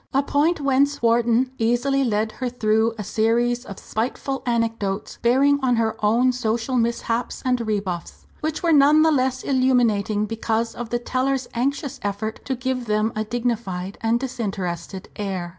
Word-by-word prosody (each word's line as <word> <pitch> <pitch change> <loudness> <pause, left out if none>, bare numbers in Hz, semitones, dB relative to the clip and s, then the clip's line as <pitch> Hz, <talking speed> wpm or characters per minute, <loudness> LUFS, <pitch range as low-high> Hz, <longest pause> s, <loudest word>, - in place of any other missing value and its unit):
A 275 - +4
point 305 +5 +1
whence 280 -1 +1
Wharton 235 +2 +3
easily 245 +4 +2
led 220 -2 0
her 255 +1 -3
through 220 -1 +1
a 210 - -4
series 235 +4 +1
of 200 - -8
spiteful 260 +4 -3
anecdotes 225 -4 -1
bearing 275 +4 +4
on 255 -2 +2
her 225 -1 0
own 235 +5 +4
social 240 +1 -1
mishaps 235 0 -1
and 250 -1 +1
rebuffs, 200 -6 -3
which 310 +1 -3
were 335 -2 +3
none 295 +2 +6
the 320 - +4
less 260 -2 0
illuminating 235 -6 +2
because 225 +1 -1
of 240 -1 -6
the 240 - 0
teller's 255 +1 -1
anxious 275 +3 -2
effort 205 +2 -4
to 265 - -1
give 255 -1 -3
them 215 +1 +1
a 215 - -1
dignified 215 -5 -3
and 230 +1 +2
disinterested 195 -8 -4
air. 190 -4 -3
235 Hz, 160 wpm, -23 LUFS, 215-260 Hz, -, none